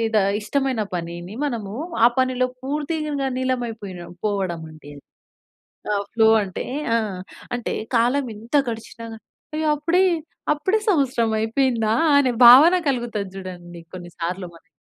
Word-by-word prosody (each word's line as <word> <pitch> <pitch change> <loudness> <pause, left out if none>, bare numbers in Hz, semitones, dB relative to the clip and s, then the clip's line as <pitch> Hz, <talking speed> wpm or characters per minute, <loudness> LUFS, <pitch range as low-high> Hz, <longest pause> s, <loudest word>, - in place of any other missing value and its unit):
The - - +6 0.2
ఇష్టమైన 265 +1 -1
పనిని 175 +2 -6
మనము 220 -7 -4 0.3
ఆ - - +9
పనిలో 255 -1 +2
పూర్తిగా 295 0 -2
నీలమైపోయిన 230 -8 -3 0.2
పోవడం 190 -5 -1
అండి. 155 -2 -13 1.0
ఆహ్, 200 -1 0
ఫ్లో 225 -2 +4 0.2
అంటే 185 -2 -5 0.3
ఆ! - - +4 0.6
అంటే 240 - -3 0.2
కాలం 250 +4 +2
ఏంత 225 +7 -5
గడిచినా 225 0 -7 0.5
అయ్యో! 315 0 -1
అప్పుడే, 335 +5 +2 0.5
అప్పుడే 345 +8 0
సంవత్సరం 255 - +1
అయిపోయిందా. 225 -1 +1 0.2
అనే 270 -3 +3
భావన 280 +9 +9
కలుగుతది 235 -6 -2
జూడండి 175 -2 -9
కొన్ని 175 -1 -8
సార్లు 180 +2 -3
మనకీ. 170 +2 -20
230 Hz, 120 wpm, -22 LUFS, 190-270 Hz, 1.0 s, ఆ